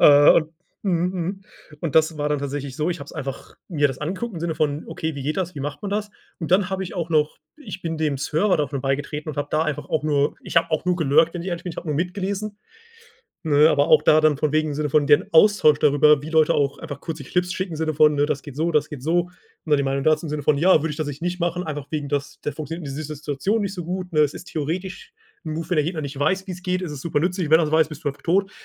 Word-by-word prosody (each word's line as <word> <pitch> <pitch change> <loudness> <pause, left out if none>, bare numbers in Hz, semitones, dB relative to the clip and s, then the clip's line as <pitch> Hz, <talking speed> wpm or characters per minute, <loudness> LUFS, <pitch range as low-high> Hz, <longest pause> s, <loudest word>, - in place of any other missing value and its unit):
Äh, 145 0 +8
und 155 -1 +2 0.3
mhm 180 -2 +1
mhm, 185 +2 -3 0.4
und 165 -4 -3
das 160 0 +3
war 150 0 -1
dann 150 - +1
tatsächlich 140 -1 -4
so, 155 +2 0
ich 175 - -3
habe - - -6
es - - -12
einfach 135 0 -7
mir 145 -5 +2
das 130 -1 -6
angeguckt 185 +9 -4
im 170 - -6
Sinne 165 -1 -2
von: 150 -1 -1
„Okay, 160 -1 -4
wie 140 - -6
geht 150 +5 -2
das? 180 -2 -2
Wie 140 - -6
macht 145 +1 -5
man 200 - -4
das?“ 210 +1 -2 0.3
Und 165 -2 -5
dann 185 0 +3
habe 190 0 -2
ich 180 - -8
auch 170 -3 -3
noch 155 -1 +2 0.2
ich 205 -11 -9
bin 165 -1 -3
dem 150 -3 0
Server 160 +8 +1
davon 145 -2 -2
beigetreten 145 +3 -2
und 150 - -5
habe 145 0 -2
da 155 +1 +2
einfach 150 -2 -3
auch 155 - 0
nur 145 -2 +1
ich - - -8
habe 165 0 +4
auch 155 0 0
nur 180 - +2
gelurkt, 160 +1 +3
wenn 175 - -4
ich 190 - -5
ehrlich 175 -1 -4
bin, 175 - -4
ich - - -14
habe 170 - -6
nur 150 - 0
mitgelesen. 195 +4 -3 0.9
Ne, 150 0 +5
aber 145 0 +2
auch 155 -2 +6
da 155 0 +5
dann, 155 -1 +4
von 150 +1 -1
wegen 155 0 +1
im 145 - -3
Sinne 150 0 -2
von 145 0 +3
deren 150 +5 +5
Austausch 165 -4 +5
darüber, 150 0 +5
wie 155 - -6
Leute 160 -1 +4
auch 140 -1 0
einfach 145 -4 -7
kurze 165 -1 -6
Clips 180 0 -1
schicken, 185 -3 -3
im - - -5
Sinne 155 0 -1
von, 150 0 +5
ne: 145 0 +2
„Das 145 -2 -2
geht 145 -3 -10
so, 165 +2 +1
das 150 -1 +1
geht 140 -4 -8
so.“ 175 +3 +1 0.4
Ne, 150 -2 +3
die 140 - 0
Meinung 135 0 -1
dazu 155 +2 +2
im - - -5
Sinne 150 -1 -3
von: 150 - +3
„Ja, 180 +6 +5
würde 160 - -1
ich - - -6
das 155 - -2
ich 145 +1 -6
nicht 175 +1 -2
machen, 175 +1 -1
einfach 145 -3 -5
wegen 150 -3 -3
dass 145 0 -3
der 150 - -3
funktioniert 160 +2 -6
die - - -5
in 135 - -6
dieser 155 0 -5
Situation 150 +9 -1
nicht 200 -1 -2
so 175 - -5
gut, 180 +1 -4
ne, 155 - +4
es 150 -1 +2
ist - - -9
theoretisch 185 - -5 0.3
'n 155 - -3
Move, 160 +1 -5
wenn 180 - +1
der 150 - +4
Gegner 165 -1 -3
nicht 140 -1 -6
weiß, 190 +7 0
wie's 180 -1 -7
geht, 185 0 -1
ist 175 -4 -4
es 145 - -7
supernützlich. 170 +1 -1
Wenn 160 - +7
er 165 - +2
es 150 - -4
weiß, 160 -1 +4
bist 155 0 -10
du - - +1
einfach 140 - -11
tot.“ 195 +3 +1
155 Hz, 290 wpm, -23 LUFS, 145-175 Hz, 0.9 s, Äh